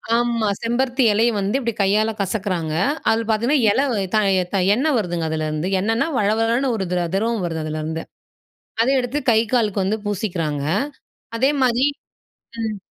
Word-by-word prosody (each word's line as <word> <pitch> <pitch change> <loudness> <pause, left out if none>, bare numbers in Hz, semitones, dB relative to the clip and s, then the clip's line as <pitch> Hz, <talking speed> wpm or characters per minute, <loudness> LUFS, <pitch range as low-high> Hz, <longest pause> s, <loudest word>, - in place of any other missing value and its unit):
ஆமாம் 230 -4 +1
செம்பருத்தி 250 +3 0
இலையை 230 +3 +3
வந்து 200 +6 0
இப்படி 235 -3 -2
கையால 215 +3 +2
கசக்கிறாங்க. 185 -5 -2 0.4
அதில் 225 +1 +1
பார்த்திங்கன்னா 235 +7 +2
இலை 270 +7 +2 0.3
தய 195 -3 +3 0.2
தய 190 +1 +3
எண்ணெய் 285 +4 +1
வருதுங்க 175 -6 -2
அதுலேருந்து. 155 +2 -2
எண்ணென்னா 225 +8 +1
வளவளன்னு 225 +5 +1
ஒரு 195 -3 -2
திர 175 -1 0
திரவம் 220 0 0
வருது 165 -2 -3
அதுலேருந்து. 155 +1 -4 0.8
அத 235 - +2
எடுத்து 255 +3 -2
கை 220 - +4
காலுக்கு 210 -5 +1
வந்து 210 +3 0
பூசிக்கிறாங்க 175 -8 -2 0.7
அதேமாதிரி 260 -1 +2 0.7
ம். 220 -2 -3
215 Hz, 140 wpm, -21 LUFS, 185-235 Hz, 0.8 s, கை